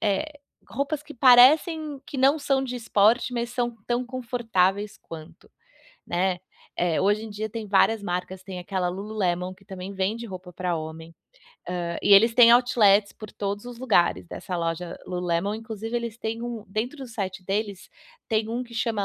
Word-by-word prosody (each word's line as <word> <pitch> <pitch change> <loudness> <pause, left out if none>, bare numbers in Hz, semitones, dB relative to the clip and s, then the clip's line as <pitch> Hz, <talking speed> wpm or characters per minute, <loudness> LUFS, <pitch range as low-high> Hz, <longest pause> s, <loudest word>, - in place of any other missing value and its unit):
eh, 290 +9 -1 0.3
roupas 280 +3 -2
que 300 0 -11
parecem 285 +4 +5
que 285 - -7
não 275 +4 +4
são 275 -2 +1
de 250 -1 -4
esporte, 230 +2 +2
mas 235 0 -2
são 240 -1 -2
tão 245 +1 -1
confortáveis 225 -6 -1
quanto, 160 -1 -12 0.6
né. 180 +1 0 0.4
Eh, 175 -1 +1
hoje 205 +3 +1
em 220 - -8
dia 215 +1 -4
tem 220 0 -6
várias 205 +2 +3
marcas, 180 +1 -4
tem 185 -2 -7
aquela 185 0 -2
Lulu 205 +4 -6
Lemon, 180 -1 0
que 195 - -23
também 190 0 -7
vende 205 +5 -2
roupa 180 -2 -9
pra 180 -2 -2
homem, 160 +1 -8 0.5
hã, 175 -1 -3
e 205 - +4
eles 225 +3 +7
têm 235 -2 +8
outlets 215 -5 +4
por 215 -1 -11
todos 205 +2 -4
os 245 -1 -9
lugares 175 - +2
dessa 180 - -6
loja 170 +1 -3
Lulu 180 0 -4
Lemon. 175 +5 0
Inclusive, 225 +1 -5
eles 235 -1 -4
têm 225 +1 -4
um 235 -3 -5
dentro 235 +8 -3
do 265 - -7
site 195 -4 -5
deles 200 0 -3 0.4
tem 220 -1 0
um 240 +2 -2
que 240 - -16
chama 220 -3 -1
215 Hz, 180 wpm, -25 LUFS, 185-240 Hz, 0.6 s, têm